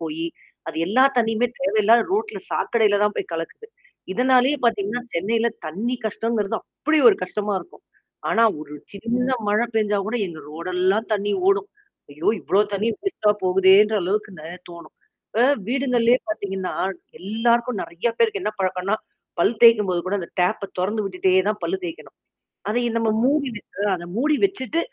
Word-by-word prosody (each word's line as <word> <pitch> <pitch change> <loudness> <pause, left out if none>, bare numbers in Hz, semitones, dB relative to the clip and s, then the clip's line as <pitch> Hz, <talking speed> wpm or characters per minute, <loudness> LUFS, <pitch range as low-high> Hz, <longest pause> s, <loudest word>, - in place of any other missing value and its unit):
போயி 160 0 -4 0.4
அது 160 - -6
எல்லா 250 +8 +4
தண்ணியுமே 225 0 +2
தேவையில்லாத 230 -4 +3
ரோட்ல 435 +3 -1
சாக்கடையில 215 -4 +2
தான் 210 0 +1
போய் - - -4
கலக்குது. 165 - -6 0.5
இதனாலேயே 255 +5 +3
பாத்தீங்கன்னா, 215 +1 0
சென்னையில 225 +7 +1 0.2
தண்ணி 210 +11 -2
கஷ்டங்கிறது 220 -1 -1
அப்படி 310 +2 -1
ஒரு 205 - +4
கஷ்டமா 205 +3 -2
இருக்கும். - - -16 0.5
ஆனா, 225 - +3 0.2
ஒரு 150 -1 -10 0.2
சின்ன 235 +5 -2 0.2
மழை 215 +3 +2
பெஞ்சா 210 -2 +1
கூட 225 +3 -1
எங்க 165 -3 -9
ரோடெல்லாம் 185 +6 0
தண்ணி 205 0 -1 0.2
ஓடும். 395 +1 +2 0.4
ஐயோ! 150 +3 -3
இவ்வளோ 200 - +2
தண்ணி 210 +3 0
வேஸ்ட்டா 220 - +1
போகுதேன்ற 190 +3 +5
அளவுக்கு 210 +4 -1
நெறையா 160 +2 -8 0.2
தோணும். 170 0 -12 0.3
இப்ப 230 - +1 0.3
வீடுங்கள்லயே 250 -2 +2
பாத்தீங்கன்னா, 195 - -3 0.5
எல்லாருக்கும் 230 +3 0
நெறையா 170 +8 -3
பேருக்கு 220 -4 +1
என்னா 210 +2 -2
பழக்கம்ன்னா? 185 +2 0 0.4
பல் 220 - +3
தேய்க்கும்போது 210 -6 +6
கூட 190 - -1
அந்த 170 - -8
டேப்ப 200 +3 +1 0.2
தொறந்து 210 +3 -1
விட்டுட்டே 185 -1 +2
தான் 210 - -4
பல்லு 380 - -1
தேய்க்கணும். 335 -2 -8 0.5
அதய 240 +3 0
நம்ம 230 -1 +1
மூடி 280 +2 +2
வச்சிட்டு 205 -1 -5
அத 175 -1 -8
மூடி 300 +5 +2
வச்சுட்டு 330 - -2
215 Hz, 150 wpm, -22 LUFS, 190-240 Hz, 0.5 s, தேய்க்கும்போது